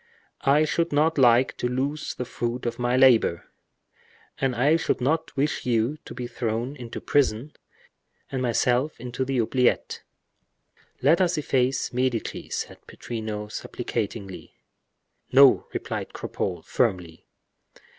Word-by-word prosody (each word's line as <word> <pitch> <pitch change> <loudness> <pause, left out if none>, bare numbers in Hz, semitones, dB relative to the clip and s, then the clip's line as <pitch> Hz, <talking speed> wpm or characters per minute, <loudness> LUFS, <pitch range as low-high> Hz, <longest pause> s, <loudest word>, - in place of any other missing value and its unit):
"I 145 +3 +5
should 170 +2 0
not 150 +1 +2
like 125 0 +5
to - - -1
lose 135 +5 -2
the 125 - -4
fruit 120 +1 -4
of 120 +1 -3
my 120 +1 +1
labor." 125 -10 +4 0.9
"And 135 -2 0
I 140 +6 +3
should 165 - 0
not 155 +6 -1
wish 145 +2 0
you 120 +4 0
to - - -9
be 125 - -4
thrown 120 +2 -3
into 120 -4 -7
prison, 140 0 0 0.8
and 130 - -2
myself 125 +4 +1
into 125 +2 -3
the 135 0 -2
oubliettes." 125 +2 +1 1.0
"Let 160 +7 +5
us 180 -2 +2
efface 130 -4 0
'Medici'," 125 -2 -2
said - - -4
Pittrino, 110 -2 -5
supplicatingly. 105 -6 -5 0.8
"No," 135 0 +6
replied - - -5
Cropole, - - -4
firmly. 85 -3 -1
125 Hz, 125 wpm, -25 LUFS, 115-140 Hz, 1.0 s, No